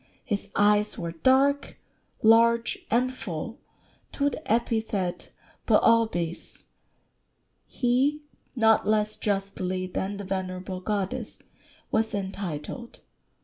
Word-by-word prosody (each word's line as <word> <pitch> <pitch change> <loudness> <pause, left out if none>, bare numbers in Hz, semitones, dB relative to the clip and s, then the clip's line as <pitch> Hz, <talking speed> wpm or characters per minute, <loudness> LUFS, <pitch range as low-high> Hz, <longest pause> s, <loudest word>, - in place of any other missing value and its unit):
His 205 -5 -2
eyes 210 +1 +3
were 170 -1 -4
dark, 265 - +2 0.5
large, 230 +1 +4
and 250 +3 +2
full 225 - -6 0.5
to 285 0 +1
the 305 -2 -6
epithet 220 -5 -1 0.4
[Greek: - - +6
boôpis] 195 -8 +1 1.0
he, 270 +5 +1 0.3
not 225 -4 +4
less 215 0 +2
justly 195 -2 -2
than 190 +2 -3
the 200 - -6
venerable 185 -1 -4
goddess, 210 +4 -3 0.5
was 220 -1 +1
entitled. 195 - -5
210 Hz, 100 wpm, -27 LUFS, 190-235 Hz, 1.0 s, Greek